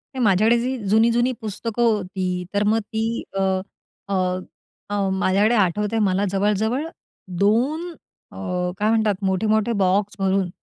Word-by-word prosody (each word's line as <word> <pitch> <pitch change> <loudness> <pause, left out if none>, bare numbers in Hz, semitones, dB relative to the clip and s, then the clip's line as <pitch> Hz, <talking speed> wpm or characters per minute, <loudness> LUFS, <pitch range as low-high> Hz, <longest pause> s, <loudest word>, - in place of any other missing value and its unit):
नाही, 255 - -1
माझ्याकडे 215 +4 +4
जी 255 +2 -2
जुनी-जुनी 235 +4 +3
पुस्तकं 225 +2 -3
होती, 185 -4 0
तर 205 +1 +1
मग 220 +2 +2
ती 225 +2 -3
अ, - - +1 0.7
अ, 200 - -3 0.8
अ, 200 -1 0
माझ्याकडे 200 +4 +2
आठवते 210 +3 +1
मला 190 +2 +1
जवळ-जवळ 210 +8 0 0.5
2 260 - +1 0.4
अ, - - -14 0.4
काय 210 +1 +1
म्हणतात 215 -3 +1
मोठे-मोठे 215 +4 +1
बॉक्स 195 +2 +1
भरून 190 -1 +1
210 Hz, 130 wpm, -22 LUFS, 195-225 Hz, 0.8 s, माझ्याकडे